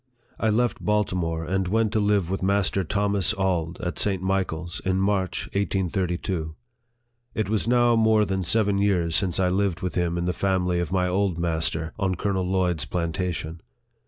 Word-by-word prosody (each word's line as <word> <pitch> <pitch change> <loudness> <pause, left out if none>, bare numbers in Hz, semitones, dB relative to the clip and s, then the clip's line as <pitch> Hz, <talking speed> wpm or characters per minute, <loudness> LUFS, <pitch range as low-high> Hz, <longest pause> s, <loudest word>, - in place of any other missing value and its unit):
I 110 - +2
left 120 +3 0
Baltimore, 90 -6 0
and 95 +2 -1
went 110 +2 +1
to 110 - +2
live 100 -4 +1
with 95 - -2
Master 100 0 +1
Thomas 100 +1 0
Auld, 90 -3 -1
at 90 -1 -3
St. 100 -3 +1
Michael's, 90 -3 -2
in 95 0 +1
March, 95 -2 0
1832. 90 -4 -1 0.8
It 110 - 0
was 110 +1 0
now 120 -1 +4
more 110 -1 +4
than 95 -1 -1
seven 100 +2 +1
years 90 -5 +1
since 90 -2 +1
I 90 -1 +3
lived 95 -2 0
with 90 - -2
him 85 -1 0
in 85 - -1
the 90 - 0
family 90 -2 0
of 85 -3 -2
my 90 -1 +1
old 95 -1 0
master, 80 -1 -1
on 95 -2 0
Colonel 95 -1 -1
Lloyd's 90 -4 0
plantation. 85 -1 -3
95 Hz, 170 wpm, -25 LUFS, 85-100 Hz, 0.8 s, now